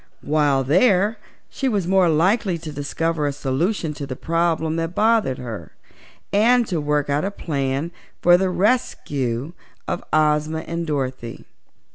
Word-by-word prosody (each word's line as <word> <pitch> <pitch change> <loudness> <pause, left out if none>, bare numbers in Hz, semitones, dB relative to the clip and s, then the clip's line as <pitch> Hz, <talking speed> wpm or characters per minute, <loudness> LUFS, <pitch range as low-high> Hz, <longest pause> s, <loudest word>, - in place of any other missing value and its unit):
While 145 -3 +2
there 195 - +3 0.3
she 270 - -2
was 205 -6 0
more 185 -1 +3
likely 185 +4 +2
to 160 -1 -8
discover 150 +2 -2
a - - 0
solution 150 +5 -1
to 145 -1 -6
the 130 - -5
problem 165 +1 0
that 165 +1 -3
bothered 220 - +2
her, 110 -10 -7 0.6
and 235 +4 +4
to 175 -7 -2
work 150 0 0
out 145 +1 0
a 195 - 0
plan 140 -4 -2 0.3
for 175 0 +6
the 185 +1 +1
rescue 150 - -1 0.3
of - - -3
Ozma 155 +1 +2
and 170 +1 -4
Dorothy. 130 -5 -4
160 Hz, 145 wpm, -22 LUFS, 145-185 Hz, 0.6 s, for